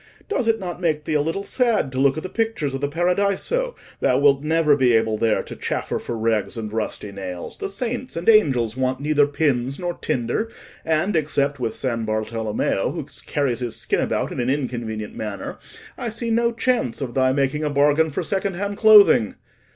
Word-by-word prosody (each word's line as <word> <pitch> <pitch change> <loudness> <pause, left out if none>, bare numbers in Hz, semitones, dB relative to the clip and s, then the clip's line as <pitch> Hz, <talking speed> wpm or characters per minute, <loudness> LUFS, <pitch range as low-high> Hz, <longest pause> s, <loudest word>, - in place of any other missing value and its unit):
Does 270 - -1
it 225 -1 +2
not 180 -2 -5
make 155 -3 0
thee 155 - -3
a 150 - +3
little 165 +6 -2
sad 225 - +1
to 130 - -3
look 140 +2 +3
at 155 - -4
the - - -3
pictures 220 - -2
of 135 - -4
the 145 - +1
Paradiso? 200 - 0 0.2
Thou 125 - +2
wilt 140 0 +4
never 155 -1 +3
be 130 -3 +3
able 110 -1 +2
there 110 -2 +2
to - - -8
chaffer - - -3
for 120 - -5
rags 110 0 0
and 110 -1 -5
rusty 105 -2 -3
nails: 95 -3 -7
the - - -3
saints 245 +5 -4
and 165 +1 -5
angels 130 - +4
want 130 0 -1
neither 145 0 +3
pins 140 -3 0
nor 175 -1 -3
tinder; 125 - -2 0.3
and 165 +5 +1
except 145 -2 0
with 115 -3 -2
San 115 -3 -2
Bartolommeo, 110 0 -1
who - - -4 0.3
carries 135 -5 0
his 120 -2 -3
skin - - -1
about - - -1
in - - -5
an 120 +1 0
inconvenient 120 -6 -3
manner, 105 -2 -5 0.4
I 235 - -2
see 230 +1 -3
no 235 +1 +2
chance 235 - 0
of 130 -4 -4
thy 130 0 +3
making 140 +2 0
a 150 - 0
bargain 145 +2 +3
for 145 - -3
second 195 -1 -1
hand 200 +2 -3
clothing. 210 - +6
145 Hz, 195 wpm, -22 LUFS, 120-190 Hz, 0.4 s, clothing